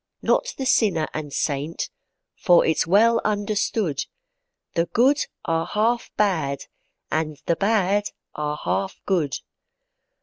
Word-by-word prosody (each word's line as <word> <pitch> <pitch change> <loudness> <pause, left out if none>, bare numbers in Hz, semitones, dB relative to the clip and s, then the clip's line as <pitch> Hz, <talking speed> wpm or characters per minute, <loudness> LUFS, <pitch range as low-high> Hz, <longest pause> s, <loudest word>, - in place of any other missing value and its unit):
Not - - +1
the 265 - -3
sinner 200 -11 +2
and 150 -2 -5
saint, 145 +3 -2 0.4
for 175 -4 +4
it's 160 0 +1
well 225 +5 +4
understood, 205 -6 0 0.7
The 170 0 +1
good 265 +8 +3 0.2
are 165 0 0
half 230 +3 0
bad, 160 -10 0 0.5
and 155 -1 -1
the 170 - +2
bad 205 0 +2 0.3
are 150 0 -3
half 195 0 -1
good. 165 -8 +1
190 Hz, 115 wpm, -23 LUFS, 155-215 Hz, 0.7 s, for